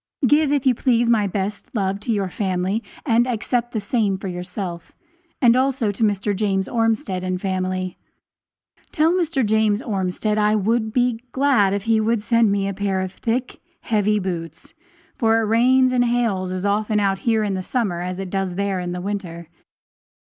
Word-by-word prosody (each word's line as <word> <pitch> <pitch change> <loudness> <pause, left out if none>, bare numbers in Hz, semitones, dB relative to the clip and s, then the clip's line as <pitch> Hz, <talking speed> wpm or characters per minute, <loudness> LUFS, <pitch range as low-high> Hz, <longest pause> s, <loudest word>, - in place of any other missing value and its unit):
Give, 295 +2 +3
if 285 -2 +1
you 260 - +5
please, 240 -1 +2
my 210 -3 +3
best 200 +1 -4
love 195 -1 0
to 210 - -3
your 200 -3 0
family 190 +3 -2 0.2
and 240 -2 +3
accept 240 0 -1
the 220 - -2
same 205 -2 0
for 195 - -6
yourself, 180 -1 -6 0.5
and 240 -2 +5
also 260 -4 +1
to 205 +3 -3
Mr. 205 -1 +1
James 195 -1 0
Ormsted 225 -5 0
and 185 0 -2
family. 185 -1 -2 0.9
Tell 335 +4 +2
James 220 -9 +1
Ormsted 210 -1 -1
I 210 0 +3
would 220 +2 0
be 245 -1 +1
glad 260 -8 +3
if 200 - -3
he 225 0 +2
would 220 0 0
send 230 -2 +3
me 200 -1 0
a 200 - -2
pair 195 -1 -1
of 185 -1 -4
thick, 245 +2 -3 0.2
heavy 210 -1 +1
boots, 170 - -5 0.5
for 225 -1 +3
it - - 0
rains 255 +4 +3
and 245 -1 +3
hails 225 -6 0
as 185 +1 -3
often 210 +1 +1
out 195 -1 +1
here 225 -4 +1
in 205 -2 -1
the 190 - -2
summer, 190 -5 -2
as 180 +1 -4
it 190 -2 -5
does 195 -2 -2
there 200 -1 -1
in 175 0 -4
the 180 - -4
winter. 180 -4 -5
210 Hz, 180 wpm, -21 LUFS, 190-235 Hz, 0.9 s, you